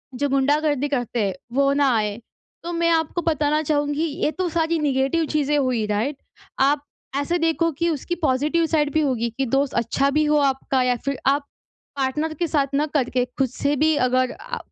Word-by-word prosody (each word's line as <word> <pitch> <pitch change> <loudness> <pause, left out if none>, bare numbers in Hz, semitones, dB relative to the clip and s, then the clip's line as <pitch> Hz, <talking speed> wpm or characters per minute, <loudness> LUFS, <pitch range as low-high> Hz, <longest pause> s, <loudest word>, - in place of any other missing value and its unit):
जो 285 +3 -1
गुंडागर्दी 290 +1 +1
करते 245 -4 -2
हैं, 195 - -1 0.2
वो 275 +1 +3
ना 280 -1 +3
आएँ? 210 0 -2 0.4
तो 340 - -4
मैं 335 0 +1
आपको 325 +1 0
बताना 305 -2 +1
चाहूँगी, 290 0 0
ये 310 0 -1
तो 370 +2 -2
सारी 330 0 0
नेगेटिव 280 +2 +1
चीज़ें 295 -1 +1
हुई, 255 -6 +1
राइट? 225 +8 -1 0.4
आप 280 +2 +3 0.3
ऐसे 285 +5 0
देखो 330 0 +1
कि 335 +3 -1
उसकी 325 +2 -2
पॉज़िटिव 305 +3 +1
साइड 300 -2 +1
भी 315 - +3
होगी, 250 -5 0
कि 270 - 0
दोस्त 270 +2 0
अच्छा 235 +4 +1
भी 305 +2 +2
हो 300 0 +3
आपका 270 -1 +1
या 250 0 +2
फ़िर 275 -1 -1
आप 280 +1 +2 0.5
पार्टनर 300 +4 -1
के 340 +2 -2
साथ 280 -3 0
ना 295 +2 +2
करके, 250 -2 +1
ख़ुद 260 0 -2
से 285 +3 -1
भी 310 +2 +3
अगर 255 0 +1
आ - - -5
285 Hz, 190 wpm, -22 LUFS, 265-315 Hz, 0.5 s, वो